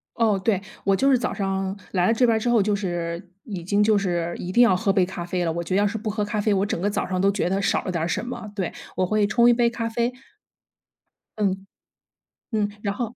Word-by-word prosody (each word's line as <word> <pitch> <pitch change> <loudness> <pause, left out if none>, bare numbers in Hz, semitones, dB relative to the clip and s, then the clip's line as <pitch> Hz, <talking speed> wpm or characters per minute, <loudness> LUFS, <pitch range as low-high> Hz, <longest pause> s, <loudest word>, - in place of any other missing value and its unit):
哦， 220 -4 +2
对。 200 -4 +2 0.2
我 195 0 +3
就 270 +7 +2
是 260 - +5
早 - - -2
上 195 -1 -2 0.2
来 180 -1 +2
了 225 - +4
这 245 +2 +3
边 230 -2 +3
儿 - - +1
之 240 +2 -1
后 230 -3 +4
就 210 +1 +1
是 175 -2 -4 0.2
已 195 -7 -6
经 205 +4 +2
就 215 -1 +4
是 175 -3 -1
一 180 - -5
定 240 +5 +6
要 195 -6 +5
喝 195 +1 +1
杯 185 -3 +3
咖 180 -2 -6
啡 180 0 -1
了， 165 - 0
我 170 +1 -3
觉 185 +2 -2
得 200 - +4
要 205 - +3
是 220 +2 -3
不 215 0 -4
喝 210 0 -1
咖 210 +1 -2
啡， 205 0 +2
我 195 +1 +2
整 200 - -2
个 200 - +1
早 210 - -2
上 185 -1 -2
都 195 +2 +3
觉 195 -3 -1
得 195 +1 0
少 - - +1
了 185 - -3
点 170 -2 -1
儿 - - 0
什 180 - -2
么。 220 -4 -6
对， 185 -4 -2 0.2
我 185 - +1
会 210 +2 +2
冲 235 +3 +4
1 - - +6
杯 235 0 +3
咖 230 -1 -3
啡 235 +2 -1 1.2
嗯， 195 -2 -1 0.9
嗯， 210 -2 +1
然 200 -1 -1
后 235 +1 -4
200 Hz, 285 characters per minute, -24 LUFS, 185-220 Hz, 1.2 s, 定